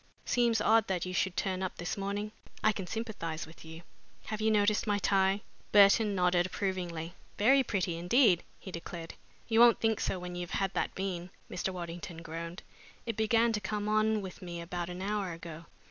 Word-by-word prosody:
"Seems 235 -2 +2
odd 220 0 +4
that 185 -2 -1
you 185 - -4
should 180 0 0
turn 190 -1 -1
up 185 - -3
this 175 +1 -3
morning. 205 +1 -3 0.3
I 215 - +5
can 195 -3 -5
sympathize 200 -8 -4
with 160 +1 -14
you. 160 +1 -10 0.4
Have 215 0 -4
you 220 - +3
noticed 210 +1 +2
my 205 -1 +2
tie?" 195 0 +2 0.3
Burton 205 +1 +6
nodded 180 -1 +3
approvingly. 175 -4 -3 0.2
"Very 265 +6 +5
pretty 185 -7 -1
indeed," 180 0 +4 0.2
he 190 - -9
declared. 170 -1 -7 0.3
"You 225 -1 +3
won't 235 -1 +7
think 225 -2 +1
so - - -1
when 180 0 -6
you've 175 0 -3
had 195 -1 0
that - - -1
bean," 185 -2 -3 0.2
Mr. 190 - -2
Waddington 170 -1 -7
groaned. 165 +2 -6 0.4
"It 230 - -2
began 225 +2 +3
to 210 - -1
come 210 +1 -2
on 215 0 +2
with 185 -2 -8
me 175 -2 -6
about 175 +1 -4
an 180 +1 -5
hour 200 -3 -1
ago. 165 0 -9
190 Hz, 190 wpm, -31 LUFS, 175-215 Hz, 0.4 s, won't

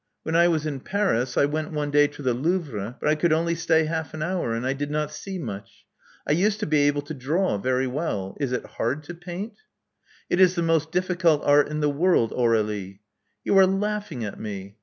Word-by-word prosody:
When 160 - -2
I 170 +1 +6
was 160 -3 0
in 145 -3 -3
Paris, 130 - 0
I - - +5
went 155 +2 -3
one 145 -1 -2
day 145 0 +5
to 145 - -11
the 125 -2 +2
Louvre; 130 - -2
but - - -2
I 150 - +5
could 155 +2 +1
only 165 +2 +2
stay 160 -1 +2
half 160 -2 -3
an 155 - -3
hour; 170 -9 -1
and 115 +2 -3
I 130 - +1
did 145 +1 -4
not 150 0 -1
see 190 +5 -6
much. 100 - -8 0.4
I - - +1
used 200 +7 +2
to - - 0
be 150 -2 +3
able 145 0 0
to 155 +2 -7
draw 150 - 0
very 130 +4 +1
well. 125 - -3
Is 140 -4 -1
it 125 - -2
hard 130 +7 -3
to 175 - -8
paint?" 175 - -7 0.7
'*It 175 - 0
is 185 -1 +5
the 170 - 0
most 160 -1 +1
difficult 180 -4 +2
art 145 0 +5
in 150 0 -3
the 150 - +2
world, 145 -6 +2
Aur^lie." 105 -5 0 0.5
You - - +1
are 190 - +7
laughing 195 - -2
at 100 - -7
me. 100 -1 -7
150 Hz, 225 wpm, -25 LUFS, 130-170 Hz, 0.7 s, are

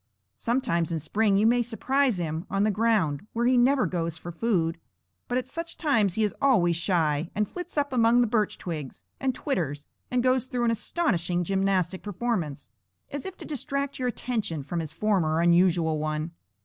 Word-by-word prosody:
Sometimes 175 -9 0
in 165 - 0
spring 200 +6 +1
you 210 - +3
may 240 +2 +4
surprise 250 +1 +1
him 160 -1 -3
on 195 +1 +1
the 215 - +3
ground, 205 -6 +1
where 235 +1 0
he 255 +1 +4
never 255 +2 +4
goes 165 -2 -2
for 175 +1 -7
food; 165 -4 0 0.5
but 245 - 0
at 255 - -2
such 335 +1 -5
times 225 - +2
he 220 - +1
is 210 - 0
always 195 -12 +4
shy, 165 -3 +1
and 210 0 +1
flits 355 - -8
up 285 -2 0
among 235 0 +4
the - - +4
birch 215 -2 0
twigs, 155 -7 -6 0.2
and 260 -2 0
twitters, 150 - -2 0.2
and 250 -1 +1
goes 255 0 +2
through 245 -1 -2
an 230 - +3
astonishing 185 - 0
gymnastic 190 -1 0
performance, 185 - -3 0.4
as 285 +2 -4
if 380 - -8
to - - -9
distract 280 -1 -3
your 255 - 0
attention 220 - -2
from 170 +5 -3
his 160 -2 -4
former 165 -3 +1
unusual 170 -2 +3
one. 155 +1 -2
205 Hz, 185 wpm, -27 LUFS, 170-245 Hz, 0.5 s, may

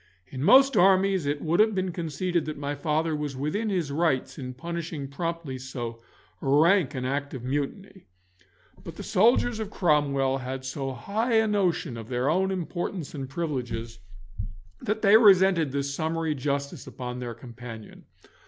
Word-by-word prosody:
In 130 +7 -7
most 270 - +6
armies 190 -3 +4
it 145 0 -1
would 165 +1 +1
have 215 -1 +4
been 185 -1 -1
conceded 170 0 -2
that 155 -1 -5
my 145 0 -3
father 155 +2 0
was 150 -2 -4
within 155 +12 -2
his 175 -7 -1
rights 155 -2 0
in 125 -1 -6
punishing 165 -1 -5
promptly 165 -2 -4
so 120 -3 -6 0.4
rank 155 +2 +3
an 125 -1 -3
act 140 +2 -2
of 125 - -7
mutiny, 145 +9 -4 0.8
but - - -8
the - - -7
soldiers 230 +3 +3
of 215 -2 -4
Cromwell 140 -7 +1
had 130 +1 -5
so 135 0 -3
high 215 - -2
a 220 0 +5
notion 180 - 0
of 115 -1 -8
their 125 +3 +1
own 190 +3 +2
importance 175 -2 -4
and 135 -3 -5
privileges, 120 - -4 0.8
that 220 +2 -2
they 205 +1 +8
resented 190 - +5
this 140 0 -2
summary 160 +1 -1
justice 140 0 -3
upon 125 -1 -6
their 120 -2 -5
companion. 115 -2 -10
150 Hz, 160 wpm, -26 LUFS, 135-185 Hz, 0.8 s, they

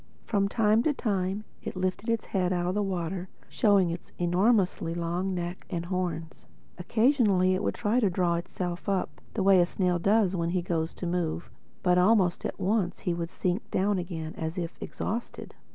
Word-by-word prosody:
From 200 -3 +1
time 220 0 +3
to 300 +4 +2
time 195 -3 -1 0.2
it - - -6
lifted 185 +4 -2
its 230 -1 0
head 185 -2 0
out 175 -1 0
of 180 - 0
the 210 - 0
water 185 -1 -3 0.2
showing 200 -5 +3
its 170 - -7
enormously 180 -1 +2
long 175 +3 -1
neck 175 +1 -4
and 170 -2 -3
horns. 175 -3 -4 0.3
Occasionally 210 -3 +3
it 185 - 0
would - - -1
try 215 +4 +1
and 205 -6 +2
draw 175 -1 +1
itself 175 +2 -3
up, 195 -2 -1
the 205 - +1
way 195 -1 +6
a 175 - +5
snail 180 -1 0
does 200 +1 +3
when 170 -1 0
he 180 0 0
goes 165 -2 -2
to - - -5
move, 170 -1 -2 0.3
but 180 -1 +4
almost 185 -2 +3
at - - -4
once 195 -2 0
it 175 - +1
would 170 -1 -3
sink 185 +3 -2
down 195 0 +1
again 165 -3 -5
as 160 +2 -3
if 170 -1 -3
exhausted. 235 +3 -5
185 Hz, 185 wpm, -28 LUFS, 175-200 Hz, 0.3 s, way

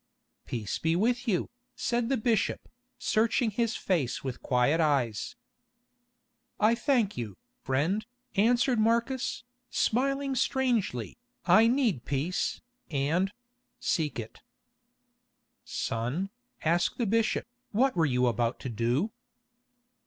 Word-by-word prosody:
"Peace 110 -4 -3
be 160 +1 +1
with 240 +6 +1
you," 190 -6 +1 0.3
said 240 0 0
the 270 - +2
bishop, 225 0 0 0.3
searching 225 +1 +2
his 230 +1 0
face 160 -10 -1
with 130 -2 -3
his - - -31
quiet 125 +6 +2
eyes. 135 -8 0 1.2
"I 215 +2 +5
thank 240 -4 +1
you, 110 -6 -5 0.2
friend," 155 +11 0 0.3
answered 240 +3 +3
Marcus, 235 +4 +1 0.3
smiling 275 +3 +1
strangely, 240 - 0 0.3
"I 225 +1 +6
need 235 - +2
peace, 145 +8 -1 0.3
and—seek 180 - -2
it." 110 -1 -8 1.2
"Son," 125 - -2 0.3
asked 170 +2 +2
the 240 - 0
bishop, 225 +2 +1 0.3
"what 260 +5 +2
were 165 -3 +3
you 125 -2 +2
about 120 0 0
to 130 - -4
do?" 120 - 0
195 Hz, 110 wpm, -29 LUFS, -, 1.2 s, I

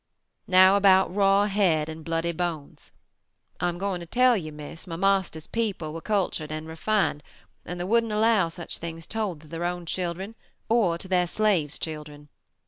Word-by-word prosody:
"Now 185 0 +7
about 190 -2 +4
Raw 200 0 +4
Head 185 -7 +2
and 160 0 -8
Bloody 165 +1 -1
Bones; 165 -3 -5 0.7
I 175 - +1
am 175 - -5
going 195 -1 -2
to 170 - -9
tell 250 +4 +4
you, 160 -7 -4
Miss, 150 +4 -9
my 165 - -5
Marster's 190 -3 +1
people 200 -9 -3
were 165 - -6
cultured 185 -7 -1
and 155 +1 -5
refined, 165 -1 0 0.4
and 180 +1 -6
they - - -2
wouldn't 230 +3 +1
allow 215 -4 +3
such 170 0 -8
things 165 0 -7
told 210 -8 -3
to 155 - -16
their 165 +2 -5
own 175 0 -2
children 180 +4 -3 0.4
or 215 -8 +3
to 190 - -7
their 180 -1 +2
slaves' 180 -7 +1
children. 150 -2 -7
175 Hz, 175 wpm, -26 LUFS, 160-200 Hz, 0.7 s, Now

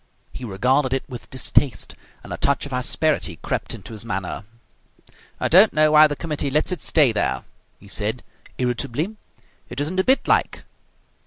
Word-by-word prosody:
He - - -8
regarded 125 +6 +1
it 135 - -3
with 125 -3 -9
distaste, 130 -3 0 0.3
and - - -7
a - - -4
touch 140 0 +1
of 140 - -8
asperity 125 - +1
crept - - -3
into - - -10
his 110 - -3
manner. 95 -2 -4 0.9
"I - - +1
don't 190 +6 +6
know 155 0 +4
why 155 0 +8
the 145 - -3
committee 150 -2 -2
lets 150 +6 0
it 180 - -3
stay 145 -7 +4
there," 105 - -1 0.4
he 100 - -16
said, 110 +4 -3 0.3
irritably. 130 - -2 0.5
"It 125 - -6
isn't 160 +6 -1
a - - +3
bit 265 +5 +2
like." - - +1
135 Hz, 170 wpm, -22 LUFS, 120-155 Hz, 0.9 s, why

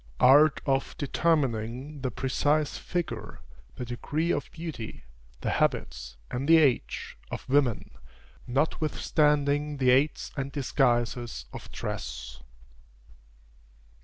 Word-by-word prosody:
ART 140 +3 +6
OF 135 -2 0
DETERMINING 135 -2 0
THE 130 - -1
PRECISE 145 +4 0
FIGURE, 175 -2 -4 0.4
THE 125 - -5
DEGREE 145 +8 -2
OF - - -2
BEAUTY, 160 -9 -7 0.4
THE - - -1
HABITS, 60 -1 -1
AND 130 +3 -2
THE 165 - +9
AGE, 140 -6 +1
OF - - -6
WOMEN, 130 -4 +1 0.6
NOTWITHSTANDING 150 +1 +1
THE 130 -2 +4
AIDS 135 +4 +2
AND 140 -1 -3
DISGUISES 120 - 0
OF - - -9
DRESS. - - -6
135 Hz, 105 wpm, -28 LUFS, 120-150 Hz, 0.6 s, THE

